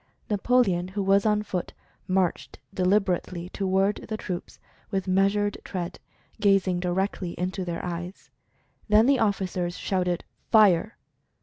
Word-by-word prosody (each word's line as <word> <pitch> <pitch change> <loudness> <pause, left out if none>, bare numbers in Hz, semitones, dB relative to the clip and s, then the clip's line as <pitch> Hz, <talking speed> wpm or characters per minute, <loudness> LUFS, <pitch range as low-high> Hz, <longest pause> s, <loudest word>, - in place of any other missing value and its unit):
Napoleon, 205 -4 +2
who 195 +2 -3
was 195 +2 +3
on 210 0 +2
foot, 185 -4 -4 0.3
marched 185 -2 0 0.2
delib 190 +3 +3
erately 180 -1 -3
toward 195 +1 +1
the 215 - -2
troops, 180 -4 -6 0.3
with 190 -1 -2
measured 200 +2 +2
tread, 180 -2 -5 0.4
gaz 195 -2 +3
ing 180 -1 0
directly 180 0 -2
into 185 +1 -2
their 175 -1 -4
eyes. 175 +2 -6 0.6
Then 215 +2 +6
the 270 0 +4
officers 185 -4 -1
shouted, 180 -2 -1 0.3
"Fire!" 215 -2 +4
190 Hz, 130 wpm, -26 LUFS, 180-205 Hz, 0.6 s, Then